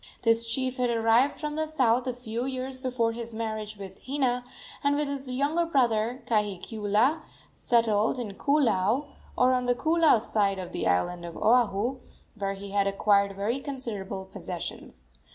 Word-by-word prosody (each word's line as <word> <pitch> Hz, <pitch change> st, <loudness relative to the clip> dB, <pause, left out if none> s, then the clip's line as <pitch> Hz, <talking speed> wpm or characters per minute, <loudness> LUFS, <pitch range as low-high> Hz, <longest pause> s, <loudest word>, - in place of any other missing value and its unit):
This 230 Hz, 0 st, +2 dB
chief 260 Hz, +1 st, -1 dB
had 250 Hz, -1 st, +1 dB
arrived 230 Hz, +3 st, +3 dB
from 300 Hz, -1 st, -3 dB
the 315 Hz, 0 st, -1 dB
south 255 Hz, -5 st, +2 dB
a 255 Hz, -, 0 dB
few 240 Hz, 0 st, -4 dB
years 260 Hz, 0 st, -4 dB
before 250 Hz, -3 st, 0 dB
his 230 Hz, 0 st, -6 dB
marriage 215 Hz, -1 st, -4 dB
with 190 Hz, -1 st, -9 dB
Hina, 260 Hz, -2 st, 0 dB, 0.4 s
and, 285 Hz, 0 st, +3 dB
with 295 Hz, 0 st, 0 dB
his 280 Hz, -1 st, -4 dB
younger 285 Hz, +7 st, +1 dB
brother, 245 Hz, -4 st, +1 dB
Kahikiula, 215 Hz, -, +1 dB, 0.3 s
settled 225 Hz, -1 st, +2 dB
in 225 Hz, -5 st, -4 dB
Koolau, 245 Hz, -1 st, +2 dB, 0.3 s
or 255 Hz, +1 st, +4 dB
on 250 Hz, -1 st, 0 dB
the 245 Hz, -, +3 dB
Koolau 320 Hz, -2 st, +4 dB
side 205 Hz, -3 st, 0 dB
of 185 Hz, -2 st, -6 dB
the -, -, -2 dB
island 90 Hz, -, 0 dB
of 170 Hz, -1 st, -7 dB
Oahu, 235 Hz, +2 st, +2 dB, 0.3 s
where 195 Hz, -2 st, -3 dB
he 195 Hz, 0 st, -8 dB
had 200 Hz, 0 st, +2 dB
acquired 200 Hz, 0 st, +2 dB
very 215 Hz, +7 st, -1 dB
considerable 215 Hz, -9 st, -5 dB
possessions. 170 Hz, -, -7 dB
230 Hz, 160 wpm, -27 LUFS, 205-260 Hz, 0.4 s, or